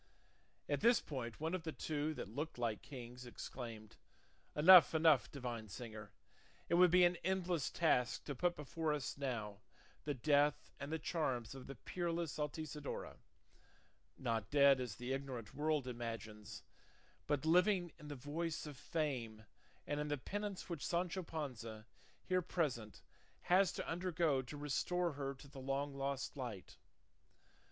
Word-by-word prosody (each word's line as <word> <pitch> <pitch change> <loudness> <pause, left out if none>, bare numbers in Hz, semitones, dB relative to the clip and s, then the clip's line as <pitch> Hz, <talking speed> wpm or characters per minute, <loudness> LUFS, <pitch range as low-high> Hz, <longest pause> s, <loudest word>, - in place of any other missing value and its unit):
At - - 0
this 235 +1 +6
point 125 -6 -5
one 160 +3 -1
of 185 - -1
the 160 0 -4
two 155 0 -2
that - - -5
looked 150 +3 -3
like 115 -3 -1
kings 125 -2 -9
exclaimed, 115 -3 -7 0.6
"Enough, 170 +2 +9
enough, 155 - +5
divine 120 -5 -4
singer! 110 0 -8 0.6
It - - +1
would 180 +1 +7
be 180 +1 +6
an 175 0 +3
endless 180 -5 0
task 125 -7 +2
to 145 - -4
put 175 +6 +1
before 150 +2 -1
us 145 -3 -3
now 115 -7 -3 0.4
the 145 -1 -1
death 145 +3 +3
and 140 +2 -5
the 160 - 0
charms 135 -8 -1
of 135 -1 -9
the 135 - -7
peerless 170 +4 -2
Altisidora, 150 0 -4 1.0
not 115 -4 -1
dead 140 -2 +6
as 120 -5 -4
the 125 +3 -3
ignorant 130 -6 -5
world 150 -2 0
imagines, 115 -3 -6 0.6
but 145 0 0
living 180 +1 +4
in 150 - -10
the 145 - -5
voice 155 +5 -3
of 145 -3 -8
fame 120 -9 -2 0.4
and 145 - -1
in 150 - -1
the 145 0 0
penance 205 +7 -4
which 170 -5 -4
Sancho 180 +2 0
Panza, 125 -10 -5 0.4
here 185 -1 +2
present, 135 - -2 0.4
has 185 +1 +4
to - - -4
undergo 170 -5 +1
to 130 +3 -8
restore 170 +5 0
her 140 -1 -4
to 135 +2 -13
the 135 -1 -10
long 135 +2 -1
lost 140 0 -2
light. 120 -9 -6
145 Hz, 150 wpm, -38 LUFS, 125-165 Hz, 1.0 s, Enough